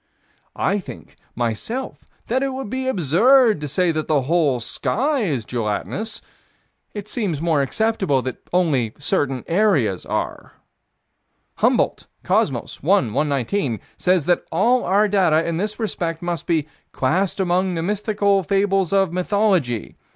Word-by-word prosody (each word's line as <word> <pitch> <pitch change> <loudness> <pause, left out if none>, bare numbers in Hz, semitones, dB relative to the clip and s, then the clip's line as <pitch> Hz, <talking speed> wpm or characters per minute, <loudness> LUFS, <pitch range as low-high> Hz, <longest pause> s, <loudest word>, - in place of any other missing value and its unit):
I 200 +1 +1
think, 185 - -11 0.2
myself, 120 - -3 0.2
that 255 +3 0
it 270 -1 -1
would 260 -5 -6
be 260 0 -2
absurd 220 - +4
to 150 - -3
say 170 +5 +1
that 155 -1 -3
the 145 -4 +2
whole 150 -3 +2
sky 250 - -1
is 140 - -1
gelatinous: 120 - -3 0.7
it 205 -1 -6
seems 205 - -2
more 160 -3 +1
acceptable 190 - 0
that 130 - -4
only 145 -11 +1
certain 135 -3 -1
areas 165 - +2
are. - - -4 1.0
Humboldt - - +1 0.2
(Cosmos, - - 0
1 105 - +2
119) 140 - 0 0.2
says 180 -4 +1
that 175 - +2
all 235 +9 +3
our 205 +3 +3
data 180 -6 +2
in 165 -1 -1
this 210 +5 -3
respect 170 -7 -3
must 175 -1 -3
be 160 -4 +1 0.3
"classed 180 +10 0
amongst 185 0 +1
the 165 - -2
mythical 205 0 +1
fables 195 0 +1
of 195 -3 +2
mythology." 180 - 0
180 Hz, 135 wpm, -21 LUFS, 145-205 Hz, 1.0 s, absurd